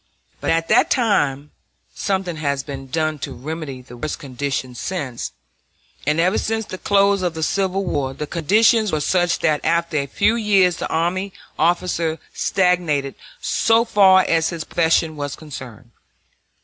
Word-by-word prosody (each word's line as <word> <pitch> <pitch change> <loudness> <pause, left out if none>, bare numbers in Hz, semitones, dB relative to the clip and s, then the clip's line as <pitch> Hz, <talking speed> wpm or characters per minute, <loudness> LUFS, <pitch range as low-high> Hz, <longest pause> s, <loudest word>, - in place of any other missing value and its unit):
But - - -3
at 165 0 +1
that - - +4
time 150 - +1 0.4
(something 190 -4 -2
has 140 -3 -1
been 135 -1 -7
done 155 +2 -1
to - - -5
remedy 140 -1 -6
the 125 -1 -12
worst 150 +5 -4
conditions 130 -2 -4
since), 140 -10 -4 0.8
and 150 +2 +2
ever 185 +5 +2
since 225 0 -2
the 185 - -8
close 200 -1 +3
of 175 -3 -1
the 160 - -3
Civil 195 +2 0
War, 140 -6 -1
the 150 - -4
conditions 215 - +3
were 155 - 0
such 175 +3 +1
that 150 -2 +1
after 170 -1 +1
a 140 -1 -1
few 205 +10 +2
years 200 -6 +3
the - - -3
army 185 +4 -1 0.3
officer 170 -1 +1 0.2
stagnated 170 -7 +1 0.3
so 225 +1 +2
far 190 -4 +5
as 165 -1 +2
his 170 -2 -4
profession 160 -1 +1
was 145 -1 -4
concerned. 130 -6 -10
165 Hz, 155 wpm, -21 LUFS, 145-190 Hz, 0.8 s, far